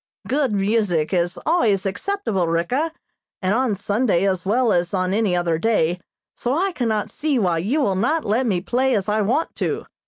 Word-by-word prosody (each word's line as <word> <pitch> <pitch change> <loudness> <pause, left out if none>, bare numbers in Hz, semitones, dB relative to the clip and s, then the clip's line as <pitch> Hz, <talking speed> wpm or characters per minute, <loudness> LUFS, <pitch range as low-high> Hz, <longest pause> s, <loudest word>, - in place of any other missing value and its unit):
"Good 275 -2 +1
music 195 -5 +1
is 175 0 0
always 220 - +2
acceptable, 205 - -1
Ricka, 245 - 0 0.5
and 190 -1 0
on 240 -2 +1
Sunday 200 -1 +1
as 190 -1 -1
well 235 +2 +2
as 175 +3 0
on 185 0 0
any 205 -4 +1
other 170 -2 0
day, 180 -5 +1 0.3
so 250 +4 -1
I 385 +3 +1
cannot 225 - -1
see 300 -3 -1
why 180 -7 +1
you 240 - 0
will 200 -8 +1
not 300 +12 0
let 230 +5 +1
me 185 -5 0
play 255 +6 +1
as 195 -1 -1
I 215 +1 +1
want 245 +11 0
to. - - -2
210 Hz, 185 wpm, -21 LUFS, 185-255 Hz, 0.5 s, always